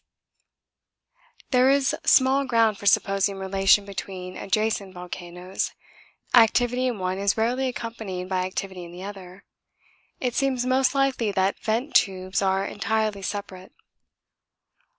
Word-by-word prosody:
There 255 0 +5
is 275 0 +3
small 265 +1 +5
ground 225 -4 +2
for 205 - -4
supposing 195 0 +2
relation 195 +1 +3
between 185 -2 -7
adjacent 210 -2 -1
volcanoes 180 +1 -5 0.6
activity 245 +2 +4
in 245 -3 -2
one 185 0 -2
is 200 +1 +1
rarely 245 +4 +1
accompanied 220 -7 -5
by 185 -1 -1
activity 185 -1 -5
in 170 - -10
the 180 +2 -9
other. 195 -1 -10 0.7
It 250 -2 -1
seems 260 -2 0
most 260 +2 +2
likely 270 -6 +1
that 190 +1 0
vent 230 +6 -2
tubes 190 -4 +1
are 195 0 +1
entirely 215 0 -1
separate. 190 -1 -6
200 Hz, 125 wpm, -25 LUFS, 190-245 Hz, 0.7 s, There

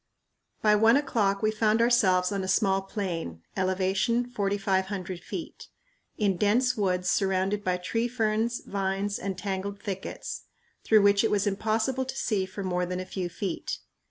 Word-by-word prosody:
By 210 -1 +5
one 225 +4 +5
o'clock 215 -8 0
we 215 - +3
found 215 0 +2
ourselves 195 -6 +3
on 200 -1 -1
a - - -3
small 195 0 +2
plain 175 - -4
(ele. 185 -1 +1
4500 195 -3 0
ft.) 320 - -7 0.5
in 200 -4 +1
dense 245 +6 +2
woods 185 -4 0
surrounded 195 +2 +1
by 185 -2 +1
tree 230 +6 -1
ferns, 230 0 0
vines, 195 +1 -2
and 195 -1 -4
tangled 200 +1 -3
thickets, 195 -1 -5 0.4
through 215 -2 +5
which 200 +1 +5
it 225 - +2
was 205 -1 +1
impossible 220 +6 0
to 260 - -6
see 195 -4 0
for 195 +1 -6
more 180 -1 -1
than 180 0 -3
a 185 - -4
few 185 -1 -4
feet. 185 +1 -4
200 Hz, 155 wpm, -27 LUFS, 190-220 Hz, 0.5 s, By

